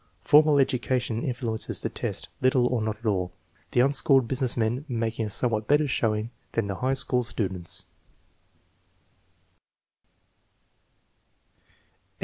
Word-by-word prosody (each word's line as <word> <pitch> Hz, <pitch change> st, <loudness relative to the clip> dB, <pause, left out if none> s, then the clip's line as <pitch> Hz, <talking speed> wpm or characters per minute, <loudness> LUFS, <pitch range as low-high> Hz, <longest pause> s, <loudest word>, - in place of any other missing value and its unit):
Formal 150 Hz, 0 st, +5 dB
education 125 Hz, -3 st, 0 dB
influences 120 Hz, -4 st, -2 dB
the -, -, -1 dB
test -, -, -5 dB
little 130 Hz, -1 st, +3 dB
or 120 Hz, -2 st, 0 dB
not 110 Hz, -1 st, -2 dB
at 115 Hz, -, -16 dB
all, 90 Hz, -4 st, -1 dB, 0.4 s
the 120 Hz, -, +2 dB
unschooled 135 Hz, -1 st, +3 dB
business 130 Hz, 0 st, 0 dB
men 115 Hz, +4 st, 0 dB
making 115 Hz, -3 st, -2 dB
a -, -, -6 dB
somewhat 110 Hz, 0 st, -1 dB
better 145 Hz, +1 st, +3 dB
showing 110 Hz, -3 st, -1 dB, 0.2 s
than 115 Hz, -, 0 dB
the 100 Hz, -1 st, -4 dB
high 130 Hz, +1 st, 0 dB
school 125 Hz, -2 st, +3 dB
students. 95 Hz, -7 st, -3 dB
120 Hz, 120 wpm, -26 LUFS, 110-130 Hz, 0.4 s, Formal